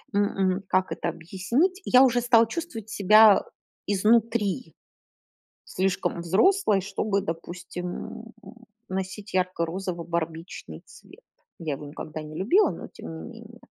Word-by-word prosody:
м, 205 Hz, -, +4 dB
м, 190 Hz, -1 st, 0 dB
как 185 Hz, 0 st, +1 dB
это -, -, -3 dB
объяснить? 235 Hz, -, -1 dB
Я 255 Hz, +1 st, +6 dB
уже 245 Hz, -2 st, +3 dB
стала 230 Hz, -1 st, +5 dB
чувствовать 225 Hz, -5 st, -6 dB
себя 215 Hz, +1 st, +6 dB, 0.4 s
изнутри 220 Hz, +2 st, +1 dB, 1.0 s
слишком 185 Hz, -2 st, 0 dB
взрослой, 205 Hz, -, +3 dB
чтобы, 200 Hz, +1 st, -1 dB
допустим, 175 Hz, +1 st, -6 dB
м, 225 Hz, +1 st, -9 dB, 0.6 s
носить 190 Hz, +2 st, -5 dB
ярко-розово-барбичный 170 Hz, -2 st, -3 dB
цвет. -, -, -16 dB, 0.4 s
Я 160 Hz, -3 st, -3 dB
его 145 Hz, -, -9 dB
никогда 155 Hz, +1 st, -7 dB
не 155 Hz, 0 st, -9 dB
любила, 305 Hz, -, +4 dB
но -, -, -7 dB
тем -, -, -10 dB
не -, -, -8 dB, 0.2 s
менее. 230 Hz, +1 st, -14 dB
195 Hz, 120 wpm, -26 LUFS, 175-225 Hz, 1.0 s, Я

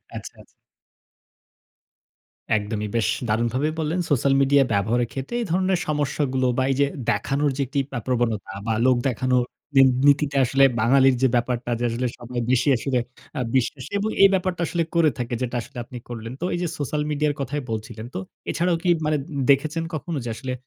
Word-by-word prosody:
আচ্ছা, -, -, -7 dB
আচ্ছা। -, -, -17 dB, 2.1 s
একদমই, 105 Hz, 0 st, -3 dB
বেশ 115 Hz, -, +1 dB, 0.2 s
দারুণভাবে 120 Hz, +7 st, +1 dB
বললেন, 160 Hz, +3 st, -1 dB
সোশ্যাল 140 Hz, 0 st, +3 dB
মিডিয়া 140 Hz, 0 st, +5 dB
ব্যবহারের 110 Hz, +4 st, +1 dB
ক্ষেত্রে 135 Hz, -, -5 dB
এই 230 Hz, -, -2 dB
ধরনের 185 Hz, 0 st, +2 dB
সমস্যাগুলো 140 Hz, -3 st, 0 dB
বা, 130 Hz, -, +3 dB
এইযে 140 Hz, +2 st, +2 dB, 0.2 s
দেখানোর 145 Hz, +1 st, 0 dB
যে 140 Hz, -, 0 dB
একটি 140 Hz, +3 st, -3 dB, 0.2 s
আ -, -, -4 dB
প্রবণতা 115 Hz, -6 st, -1 dB
বা, 115 Hz, -, +1 dB
লোক 130 Hz, -1 st, +5 dB
দেখানোর 125 Hz, 0 st, +1 dB, 0.4 s
এ -, -, +9 dB, 0.2 s
নীতিতে 145 Hz, 0 st, +3 dB
আসলে 135 Hz, +2 st, +4 dB, 0.2 s
বাঙালির 130 Hz, +3 st, +5 dB
যে 130 Hz, -, +5 dB
ব্যাপারটা 120 Hz, 0 st, 0 dB
যে 120 Hz, -, 0 dB
আসলে 125 Hz, +2 st, -1 dB
সবাই 120 Hz, 0 st, -5 dB
বেশি 130 Hz, +2 st, +2 dB
আসলে 130 Hz, +1 st, -1 dB, 0.4 s
আ -, -, -1 dB
বিশ্বাসী 130 Hz, 0 st, -1 dB
এবং 215 Hz, +2 st, -1 dB
এই 195 Hz, -, +9 dB
ব্যাপারটা 185 Hz, -2 st, -1 dB
আসলে 170 Hz, +1 st, 0 dB
করে 165 Hz, -3 st, +4 dB
থাকে 120 Hz, 0 st, -2 dB
যেটা 125 Hz, 0 st, -2 dB
আসলে 140 Hz, +1 st, -12 dB
আপনি 125 Hz, -, -11 dB
করলেন। 115 Hz, -1 st, -6 dB
তো -, -, -3 dB
এইযে 175 Hz, -1 st, -1 dB
সোশ্যাল 150 Hz, +1 st, -1 dB
মিডিয়া 150 Hz, 0 st, +1 dB
কথাই 140 Hz, +2 st, -2 dB
বলছিলেন। 110 Hz, +1 st, -5 dB
তো -, -, -2 dB, 0.3 s
এছাড়াও 170 Hz, 0 st, +1 dB
কি 180 Hz, -, +2 dB, 0.2 s
মানে 155 Hz, -, +2 dB
দে-দেখেছেন 145 Hz, +2 st, +1 dB
কখনো 155 Hz, 0 st, -3 dB
যে -, -, -4 dB
আসলে 130 Hz, +2 st, -5 dB
135 Hz, 175 wpm, -23 LUFS, 120-150 Hz, 2.1 s, এ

